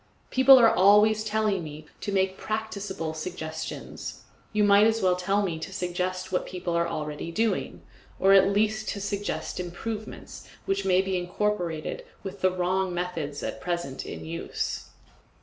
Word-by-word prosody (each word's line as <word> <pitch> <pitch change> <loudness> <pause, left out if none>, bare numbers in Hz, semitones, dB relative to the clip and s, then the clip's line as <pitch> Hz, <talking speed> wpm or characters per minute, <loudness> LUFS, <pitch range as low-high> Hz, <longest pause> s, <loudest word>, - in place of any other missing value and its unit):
People 265 +1 +8
are 230 -2 +6
always 210 +3 +5
telling 215 -3 0
me 155 0 -8
to 205 - -4
make 190 -1 +1
PRACTICABLE 200 -6 -4
suggestions. 160 0 -6 0.3
You 215 -1 +2
might 205 +1 +6
as 225 0 +1
well 185 -3 +3
tell 195 +3 +1
me 170 -5 -2
to 175 - -6
suggest 185 0 -3
what 180 - 0
people 180 -2 -4
are 170 0 +2
doing - - -3
already, 165 +8 -2 0.4
or 195 +1 +5
at 195 0 +7
least 215 +2 +1
to 200 - -3
suggest 200 -1 -3
improvements 210 +5 -6 0.2
which 195 0 -1
may 185 0 +4
be 190 -1 -1
incorporated 175 -3 -2 0.2
with 195 0 -7
the 185 - +5
wrong 185 0 0
methods 165 -5 -3
at - - -4
present 170 -7 -3
in - - -7
use. 165 +1 -4
190 Hz, 155 wpm, -27 LUFS, 175-205 Hz, 0.4 s, People